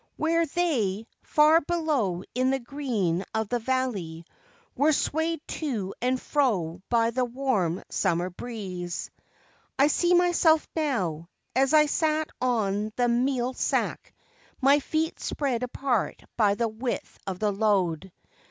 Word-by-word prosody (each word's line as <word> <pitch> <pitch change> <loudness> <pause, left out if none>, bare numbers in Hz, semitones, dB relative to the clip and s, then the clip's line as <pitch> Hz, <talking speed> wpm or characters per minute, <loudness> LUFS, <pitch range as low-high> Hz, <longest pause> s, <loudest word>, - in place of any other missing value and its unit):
Where 330 +1 +2
they, 235 - 0 0.2
far 310 +2 +5
below 285 - -1
in 255 +1 +1
the 270 - +2
green 235 - -2
of 220 -2 -1
the 245 - 0
valley, 220 -10 -2 0.5
were 305 +2 +3
swayed 320 +2 0 0.2
to 225 - -2
and 255 +1 +1
fro 190 - 0
by 230 -1 +3
the 255 +2 0
warm 240 -9 -1
summer 175 +2 0
breeze. 180 -5 -6 0.7
I 280 +2 +5
see 350 +3 +3
myself 345 -3 +4
now, 185 - -1 0.3
as 270 +3 +3
I 300 0 +7
sat 310 +1 0
on 215 -4 0
the 245 -1 +2
meal 250 +1 +1
sack, - - -2 0.4
my 280 +2 +5
feet 315 +3 -2
spread 265 -5 -2
apart 250 -2 -1
by 205 -3 +3
the 230 +2 0
width 230 +3 -4
of 190 -2 -3
the 210 +1 +1
load. 190 -4 0
245 Hz, 135 wpm, -27 LUFS, 200-290 Hz, 0.7 s, I